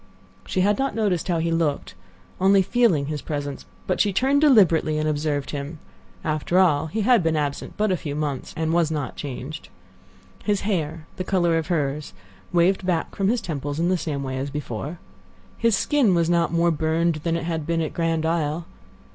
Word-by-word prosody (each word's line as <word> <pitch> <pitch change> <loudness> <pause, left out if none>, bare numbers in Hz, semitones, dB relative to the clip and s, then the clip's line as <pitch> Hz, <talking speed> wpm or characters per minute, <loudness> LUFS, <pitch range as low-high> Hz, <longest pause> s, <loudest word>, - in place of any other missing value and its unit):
She 185 - 0
had 205 +2 +2
not 270 -5 0
noticed 200 -6 0
how 175 -2 +1
he 165 +1 0
looked—only 170 +4 0
feeling 190 -10 +2
his 150 -1 -4
presence; 145 -2 -5 0.2
but 185 - +1
she 205 - +2
turned 270 +8 +2
deliberately 180 - +4
and 155 0 0
observed 145 -2 -1
him. 145 +2 -5 0.5
After 155 +3 0
all, 160 -5 +4
he 215 +8 -2
had 235 0 +4
been 165 -1 +1
absent 145 -2 -3
but 210 -1 +1
a 185 - +1
few 150 -3 -5
months, 145 -3 -3
and 160 0 0
was 170 -2 +3
not 145 -6 -3
changed. 140 +2 -7 0.7
His 205 -2 +1
hair—the 165 -3 -3
color 175 -3 +2
of 165 -1 -1
hers—waved 150 - -1
back 175 -3 -1
from 195 - 0
his 235 +2 +1
temples 145 -2 -4
in 170 +1 +2
the 185 - +3
same 150 -5 -3
way 130 -1 -3
as 140 +2 -3
before. 145 +2 -5 0.6
His 230 -3 +3
skin 260 -11 +3
was 170 0 +2
not 170 -1 +2
more 170 0 +3
burned 160 +1 +1
than 165 +1 0
it 170 - -4
had 165 -2 -3
been 165 -1 +1
at 155 - -4
Grand 165 -1 0
Isle. 160 0 -1
165 Hz, 185 wpm, -24 LUFS, 150-185 Hz, 0.7 s, deliberately